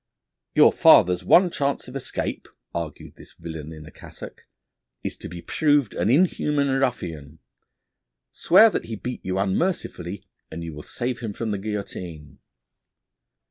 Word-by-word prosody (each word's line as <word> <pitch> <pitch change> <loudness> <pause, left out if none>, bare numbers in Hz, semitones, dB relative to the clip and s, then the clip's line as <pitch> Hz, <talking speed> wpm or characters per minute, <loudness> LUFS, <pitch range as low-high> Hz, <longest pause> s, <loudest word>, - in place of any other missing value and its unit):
'Your - - +7
father's 90 0 +5
one 175 - +5
chance 140 -3 -2
of 125 - -10
escape,' 135 - -4 0.3
argued 85 -3 -6
this - - -13
villain 80 -2 -8
in 75 -1 -10
a - - -12
cassock, - - -12 0.6
'is - - -3
to - - -8
be 85 -1 -9
proved 145 -7 +2
an 90 +5 0
inhuman 150 -1 +2
ruffian. 90 - -2 0.9
Swear 215 +5 +6
that - - -3
he 110 - -5
beat 125 +4 -6
you 95 0 -2
unmercifully 95 - -2 0.3
and 85 +1 -7
you 80 -1 -6
will 75 - -8
save 125 +8 -4
him 110 -4 -5
from 110 +1 -3
the 100 - -2
guillotine.' 90 -8 -6
100 Hz, 145 wpm, -24 LUFS, 85-135 Hz, 0.9 s, Your